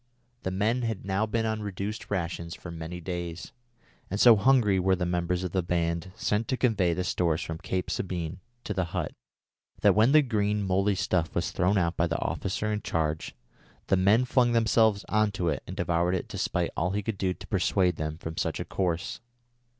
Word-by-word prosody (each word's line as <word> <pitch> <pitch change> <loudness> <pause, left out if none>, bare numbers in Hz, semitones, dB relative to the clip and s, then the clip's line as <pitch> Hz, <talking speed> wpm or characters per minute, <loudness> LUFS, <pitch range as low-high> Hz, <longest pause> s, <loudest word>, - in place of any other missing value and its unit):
The - - -2
men 105 +7 0
had 115 -5 -3
now 100 +3 0
been 115 +1 0
on 110 -1 -1
reduced 100 +1 -5
rations 85 -2 -3
for 85 - -9
many 85 +1 -6
days, 85 -1 -5 0.6
and 100 - -2
so 120 -1 +8
hungry 105 -4 +4
were 95 +1 +3
the 90 -1 -2
members 90 +1 -1
of 90 - -3
the 95 - +1
band 85 +1 -1
sent 105 +2 0
to 130 - -1
convey 100 -10 +2
the 90 - -1
stores 85 -2 0
from 80 -1 -5
Cape 90 +1 -3
Sabine 85 -1 -3 0.2
to - - -3
the 95 - 0
hut - - -2 0.7
that - - +6
when 110 +5 +4
the 155 0 +6
green 105 -4 0
mouldy 95 +1 +2
stuff 90 -3 0
was 85 - 0
thrown 95 +3 +2
out 85 -2 0
by 85 - +2
the 80 - -1
officer 105 +3 -2
in 105 - -2
charge, 80 -5 -2 0.5
the - - +5
men 100 +7 +4
flung 120 -1 +3
themselves 110 -2 +3
on 110 0 +2
to 90 -3 0
it 75 - -1
and 95 - -7
devoured 90 0 +1
it 90 - -3
despite 85 -1 -1
all 85 +2 0
he 105 0 -1
could 100 -2 -3
do 95 -1 0
to - - -11
persuade 90 -3 +1
them 75 0 -3
from 80 -1 -7
such - - -1
a - - -3
course. 90 -3 -2
95 Hz, 205 wpm, -28 LUFS, 85-105 Hz, 0.7 s, so